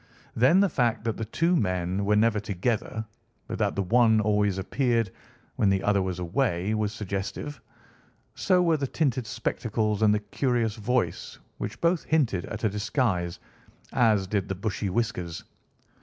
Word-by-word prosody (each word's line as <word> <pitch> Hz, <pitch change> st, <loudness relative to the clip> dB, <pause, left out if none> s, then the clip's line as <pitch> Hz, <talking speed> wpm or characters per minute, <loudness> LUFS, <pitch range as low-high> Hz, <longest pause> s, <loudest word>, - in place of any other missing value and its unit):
Then 135 Hz, -, +5 dB
the 200 Hz, -, +4 dB
fact 120 Hz, -7 st, 0 dB
that 115 Hz, -1 st, -1 dB
the 110 Hz, -, -3 dB
two 165 Hz, -, +1 dB
men 90 Hz, -, 0 dB
were 105 Hz, +1 st, +3 dB
never 110 Hz, 0 st, +3 dB
together, 110 Hz, +2 st, -2 dB, 0.4 s
but -, -, -5 dB
that -, -, +1 dB
the 100 Hz, -, 0 dB
one 110 Hz, +2 st, +4 dB
always 105 Hz, -2 st, +1 dB
appeared 115 Hz, +1 st, 0 dB, 0.5 s
when 100 Hz, -, +3 dB
the 95 Hz, 0 st, +1 dB
other 100 Hz, -1 st, +2 dB
was 95 Hz, -2 st, -2 dB
away, 90 Hz, +1 st, 0 dB
was 105 Hz, -1 st, 0 dB
suggestive. 100 Hz, +7 st, -5 dB, 0.7 s
So 180 Hz, -2 st, +2 dB
were 165 Hz, -2 st, +3 dB
the 140 Hz, -2 st, -2 dB
tinted 130 Hz, -5 st, -1 dB
spectacles 110 Hz, -3 st, -1 dB
and 110 Hz, -1 st, +5 dB
the 105 Hz, -, +2 dB
curious 115 Hz, +1 st, 0 dB
voice, 120 Hz, +3 st, -1 dB, 0.2 s
which 105 Hz, +1 st, -5 dB
both 170 Hz, 0 st, +2 dB
hinted 130 Hz, -, +1 dB
at 110 Hz, +2 st, -7 dB
a 110 Hz, -, +3 dB
disguise, 100 Hz, -, -1 dB, 0.5 s
as 110 Hz, -5 st, +3 dB
did 100 Hz, 0 st, -2 dB
the 95 Hz, -, -1 dB
bushy 100 Hz, +1 st, -2 dB
whiskers. 90 Hz, -6 st, -2 dB
110 Hz, 160 wpm, -27 LUFS, 100-120 Hz, 0.7 s, Then